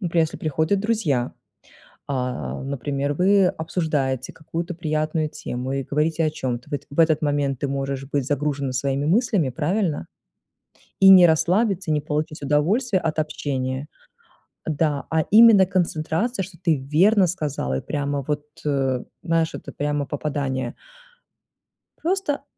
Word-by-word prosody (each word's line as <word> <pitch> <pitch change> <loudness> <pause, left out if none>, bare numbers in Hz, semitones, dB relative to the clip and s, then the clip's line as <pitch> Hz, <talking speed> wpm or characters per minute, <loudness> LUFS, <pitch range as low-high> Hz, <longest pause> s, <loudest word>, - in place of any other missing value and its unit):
Например, 170 -3 +2
если 160 - -6
приходят 160 +5 0
друзья, 195 - 0 0.8
а, 125 -2 -3
например, 140 +1 -2
вы 190 +5 +4
обсуждаете 150 -7 -2
какую-то 170 +3 -5
приятную 155 -1 -1
тему, 125 -2 -5
и 135 0 -1
говорите 155 +4 0
о - - +2
чём-то. 125 -5 -4
В - - -8
этот 140 - -3
в 145 - -4
этот 160 -2 +4
момент 145 -3 0
ты 140 - -1
можешь 135 0 -3
быть 140 -3 0
загружена 140 -1 -1
своими 135 +2 -1
мыслями, 185 - +2
правильно? 165 - -1 0.9
И 195 - +9
не 185 -2 +9
расслабиться, 180 +3 +1
не 150 -1 +1
получить 150 +1 -3
удовольствие 180 - +1
от 160 -1 -1
общения. 135 -3 -3 0.8
Да, 150 -2 0
а 160 -1 +2
именно 215 -3 +8
концентрация, 185 +4 -1
что 185 -1 -11
ты 165 -4 +1
верно 180 +9 +3
сказала, 145 - -2
и - - -9
прямо 145 -1 -2
вот, 150 -1 -2 0.2
э, 135 -3 0 0.2
знаешь, 165 -2 0
это - - -9
прямо 145 0 -1
попадание. 140 -2 -3 1.2
Просто 345 -4 -1
150 Hz, 140 wpm, -23 LUFS, 140-175 Hz, 1.2 s, И